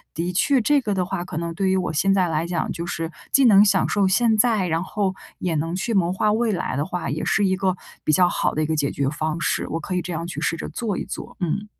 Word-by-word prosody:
的 170 +2 -2
确 270 +8 +3
这 290 +5 +3
个 210 -4 -1
的 180 -1 0
话， 185 -1 -3
可 175 -3 -7
能 170 0 -3
对 190 +2 0
于 190 - +2
我 180 -3 -2
现 195 +6 +2
在 185 -2 +2
来 160 +1 -1
讲 170 -2 -2
就 170 +1 -5
是， 165 -1 -3 0.2
既 275 -2 +5
能 205 -3 +7
享 205 - +3
受 200 -2 +2
现 225 +4 +3
在， 215 -5 +3
然 165 +2 0
后 195 -1 -1 0.2
也 175 -2 -2
能 165 +3 -1
去 225 +5 -2
谋 180 -3 +2
划 210 +3 +1
未 230 0 +1
来 180 -3 -2
的 145 +2 -1
话 180 -1 -4
也 - - -3
是 205 - +2
一 190 0 +2
个 190 -1 0 0.3
比 - - +1
较 180 +4 +5
好 - - 0
的 155 - +1
一 - - +1
个 160 - -1
解 145 -2 0
决 140 - -1
方 155 +2 -3
式， - - -1
我 165 - -2
可 180 +3 -4
以 180 - +1
这 180 - -6
样 165 +1 -3
去 175 - -6
试 165 - 0
着 - - -5
做 215 -5 -3
一 - - -3
做， - - -8
嗯。 195 +5 -1
180 Hz, 305 characters per minute, -23 LUFS, 165-200 Hz, 0.3 s, 能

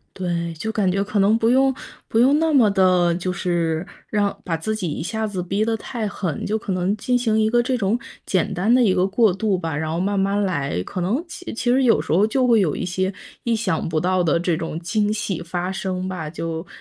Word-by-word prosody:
对， 170 -2 -2
就 220 +8 -4
感 200 -4 +1
觉 195 +2 +1
可 210 0 -2
能 205 +3 +4
不 225 0 +2
用 265 +2 +4 0.4
不 225 - 0
用 270 +5 +5
那 325 -1 +2
么 245 -7 +5
地 185 -3 +3
就 180 +1 -2
是 170 -1 -1 0.2
让 205 -1 0
把 165 -2 -1
自 215 +7 -3
己 185 -7 -3
一 - - -4
下 220 +5 -2
子 195 -3 -4
逼 195 +4 0
得 225 0 0
太 225 -2 -4
狠， 180 -6 -4
就 215 +2 0
可 200 - -4
能 185 +3 0
进 250 +3 0
行 225 -3 +1
一 215 - +3
个 240 +1 +3
这 255 0 0
种 205 +2 +1 0.3
简 185 +1 0
单 190 +5 +1
的 250 - +5
一 200 -5 +4
个 185 0 +2
过 205 0 +3
渡 195 0 0
吧， 165 -4 -3
然 155 +1 -2
后 170 - -1
慢 200 +1 0
慢 200 +1 +1
来， 140 - -1
可 180 - -5
能 220 - 0
其 365 - -8
其 240 +1 -1
实 260 +1 +3
有 230 - +4
时 - - -9
候 195 +6 +4
就 255 +3 +1
会 230 - +5
有 160 -7 +1
一 - - -3
些 185 +2 -1 0.3
意 235 -1 +1
想 220 -7 -1
不 160 -1 0
到 185 +1 +1
的 170 +1 +2
这 175 -2 0
种 165 -1 -4
惊 210 +4 0
喜 200 -5 -2
发 180 +2 -3
生 185 -1 -3
吧， 180 -5 -4
就 165 +1 -5
195 Hz, 265 characters per minute, -22 LUFS, 175-220 Hz, 0.4 s, 用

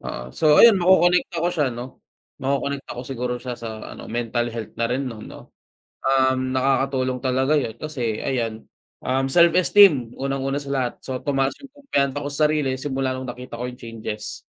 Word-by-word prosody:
Ah, - - -6
so 155 - +3
ayun 225 -5 +8
makokonekta 175 -1 +3
ko 175 - +2
siya 150 -5 0
'no, 125 +2 -8 0.4
makokonekta 140 0 -2
ko 125 - -6
siguro 125 -1 -3
siya 125 -1 -5
sa 110 -1 -7
ano, - - -9
mental 120 +1 -1
health 115 -1 -6
na 115 - +1
rin 125 +3 -1
'no, 115 - -9
'no? - - -12 0.5
Um, 130 -1 +1
nakakatulong 130 -1 +1
talaga 130 +2 +1
yun 115 -4 -5
kasi 120 -6 -3
ayan, 115 -4 -2 0.4
um, 135 +1 0
self-esteem 170 - +5
unang-una 135 0 -2
sa 140 -1 -5
lahat. 130 -3 0
So, 130 -1 -3
tumaas 135 -2 0
yung 275 - -11
kumpiyansa 145 - -2
ko 145 - -3
sa 150 +2 +3
sarili 145 -4 0
simula 135 -2 -1
nung 130 0 -5
nakita 120 -1 -7
ko 125 - -2
yung 125 - -8
changes. 110 -2 -6
130 Hz, 175 wpm, -23 LUFS, 120-145 Hz, 0.5 s, ayun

